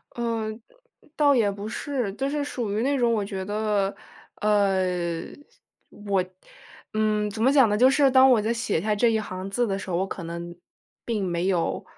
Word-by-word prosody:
嗯， 230 -2 -2 0.2
呃 - - -26 0.4
倒 290 -2 +4
也 215 -5 +2
不 200 +1 -7
是， 245 -3 -3
就 270 +6 -2
是 290 0 -1
属 235 -7 -3
于 215 - 0
那 280 +2 +1
种 240 -2 +2
我 210 -3 0
觉 195 -1 -5
得， 205 -1 -1 0.5
呃， 200 -3 +2 1.0
我 200 -3 -1 0.7
嗯， 215 -1 +1
怎 215 +1 -6
么 260 +4 +4
讲 270 -5 +6
呢， 210 - +1
就 255 +4 +6
是 275 0 +4
当 260 0 +7
我 230 - +4
在 220 +2 0
写 230 -8 -1
下 215 +1 0
这 235 +3 +3
一 220 - +1
行 190 -2 -6
字 240 +5 0
的 195 - -1
时 195 - -8
候， 170 - 0
我 190 +2 -1
可 190 - -6
能 170 +1 -7 0.5
并 220 -4 -1
没 175 0 -1
有 180 -4 0
210 Hz, 210 characters per minute, -25 LUFS, 195-240 Hz, 1.0 s, 当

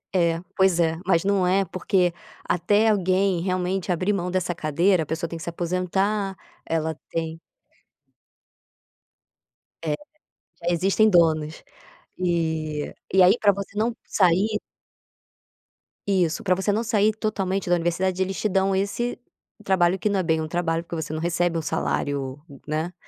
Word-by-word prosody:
É, 170 -2 +2 0.2
pois 190 -2 +3
é, 160 -1 +2
mas 175 -1 +2
não 195 -2 +2
é, 190 +2 +2
porque 180 0 +1 0.3
até 205 +5 +2
alguém 190 -2 +2
realmente 185 0 -1
abrir 185 +4 +1
mão 180 -2 -2
dessa 180 -2 -1
cadeira, 170 +3 +2
a - - -9
pessoa 160 +2 -3
tem - - -6
que 160 - -8
se - - -3
aposentar, 190 +4 -1 0.3
ela 160 -1 -1
tem 165 0 -3 2.4
É, 155 - -1 0.7
já 175 - +1
existem 195 +5 +3
donos. 160 -4 +2 0.6
E 160 -4 -1 0.2
e 190 - +6
aí 195 +6 +6
pra 205 -2 +5
você 200 +1 -7
não 230 +2 0
sair 200 +3 +2 1.5
Isso, 175 -5 +1
pra 185 -2 +2
você 190 +2 0
não 220 +3 0
sair 215 -2 +3
totalmente 195 -4 -2
da 175 - +5
universidade 175 +2 0
eles 190 +1 -4
te - - +1
dão 195 0 +1
esse 200 +6 -1 0.5
trabalho, 185 -1 +2
que 210 - 0
não 195 -2 +1
é - - -4
bem 160 -1 +1
um 155 - -3
trabalho, 165 0 -1
porque 170 0 -7
você 160 -1 -4
não 155 - -3
recebe 170 0 0
um - - -1
salário, 140 -2 -2 0.3
né. 155 +4 -2
180 Hz, 155 wpm, -24 LUFS, 165-195 Hz, 2.4 s, e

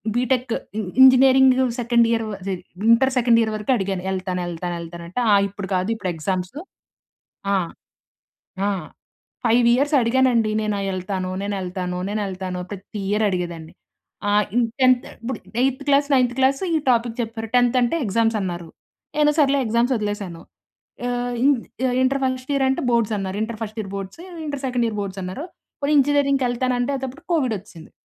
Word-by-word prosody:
BTech 250 0 0 0.3
ఇ - - 0 0.2
engineering 260 0 +7 0.2
second 235 0 +3
year 225 -1 +1 0.2
జ - - -1 0.4
inter 265 +3 +4
second 235 -2 +4
year 220 -1 0
వరకు 210 +4 -2
అడిగాను. 195 -2 -2
ఎళ్తాను 185 -1 -2
ఎళ్తాను 175 +1 -4
ఎళ్తాను 170 +1 -8
అంటే 185 +9 -3 0.3
"ఇప్పుడు 200 0 -7
కాదు 185 +3 0
ఇప్పుడు 205 -4 -3
ఎగ్జామ్స్." 185 - -3 1.0
ఆ! - - +4 1.1
ఆ! - - +2 0.8
5 235 +1 +4
ఇయర్స్ 285 +4 +1
అడిగానండి. 235 -2 +3
నేను 210 -1 -1 0.2
ఎళ్తాను. 185 0 -3
నేను 205 0 -2
ఎళ్తాను. 180 0 -4
నేను 210 +1 -1
ఎళ్తాను. 185 -1 -5
ప్రతి 200 +1 -7
ఇయర్ 210 +2 +1
అడిగేదాన్ని. 170 -4 -4 0.6
ఆ! - - +2 0.2
ఇన్ 245 -1 +4 0.2
10థ్ 255 -1 +4 0.2
ఇప్పుడు 255 +3 -4 0.2
ఎయిత్ 265 +1 0
క్లాస్ 285 0 +4
నైన్త్ 250 -2 +3
క్లాస్ 270 +1 +2
ఈ - - +4
టాపిక్ 235 -1 +1
చెప్పారు 225 0 -5
10థ్ 245 +1 +4
అంటే 240 +7 +1
ఎగ్జామ్స్ 225 +2 +1
అన్నారు. 175 -2 -4 0.5
నేను 300 0 +5
సర్లే 280 -2 +4
ఎగ్జామ్స్ 235 +3 +2
వదిలేసాను. 205 -5 -4 0.7
ఆహ్, 245 0 -2
ఇ - - +5 0.6
ఇంటర్ 270 +1 +1
ఫస్ట్ 260 +1 -2
ఇయర్ 275 -1 +2
అంటే 265 - 0
బోర్డ్స్ 230 -2 +2
అన్నారు. 190 0 -4
Inter 220 0 -4
first 215 0 -6
year 195 -2 -6
boards 195 - -7 0.3
inter 285 -2 -4
second 245 -2 0
year 210 -2 -4
boards 195 -1 -5
అన్నారు. 185 - -5 0.4
పోనీ 290 +2 +2
ఇంజనీరింగ్‌కి 280 -1 +2
వెళ్తాను 250 +1 0
అంటే 245 +3 0 0.2
అప్పుడు 270 +6 -12
కోవిడ్ 265 -9 +1
వచ్చేసింది. 170 -4 -14
230 Hz, 165 wpm, -22 LUFS, 190-255 Hz, 1.1 s, engineering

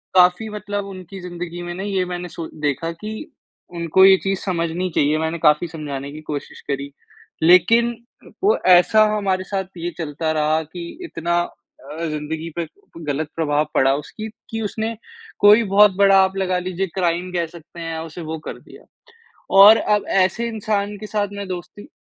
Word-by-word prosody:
काफ़ी 180 +4 +4
मतलब 205 -1 -4
उनकी 190 -1 -9
ज़िंदगी 175 -1 -6
में 175 0 -5
ना 190 - -5
ये 195 -2 0
मैंने 180 0 -5
सो 165 -1 -6
देखा 150 +3 -1
कि 215 +1 -5 0.6
उनको 170 +3 +4
ये 190 0 +8
चीज़ 195 -1 -1
समझनी 175 0 -2
चाहिए, 150 +2 +3
मैंने 160 +1 -2
काफ़ी 150 +2 +3
समझाने 145 -4 -6
की 155 +1 -9
कोशिश 150 -2 -6
करी। 140 0 -3 0.5
लेक़िन 225 +8 +5 0.5
वो 415 +3 +4
ऐसा 180 +4 +6
हमारे 190 -2 0
साथ 195 0 -2
ये 170 +1 -3
चलता 160 -1 -2
रहा 155 +1 +1
कि 160 +3 -9 0.2
इतना 170 - -1
अ, 170 -1 -8
ज़िंदगी 155 +1 -4
पे 170 - -1 0.4
ग़लत 145 +1 -2
प्रभाव 150 -2 +1
पड़ा 135 0 +4
उसकी 215 +9 -6 0.2
कि 225 0 -4
उसने 220 +2 -3 0.4
कोई 210 +3 +7
बहुत 210 0 +7
बड़ा 195 -1 +6
आप 190 0 -1
लगा 185 -1 0
लीजिए 185 +1 -3
क्राइम 180 0 0
कह 170 -1 0
सकते 170 +1 -14
हैं 165 0 -4
या 160 0 -4
उसने 165 +1 -8
वो 160 +1 -4
कर - - -6
दिया। - - -16 0.8
और 210 +3 +10
अब 210 -2 +1 0.2
ऐसे 230 +6 -1
इंसान 210 -2 -2
के 215 - -7
साथ 210 -1 -1
में 200 -1 -6
दोस्ती 180 +4 -7
180 Hz, 175 wpm, -21 LUFS, 160-200 Hz, 0.8 s, और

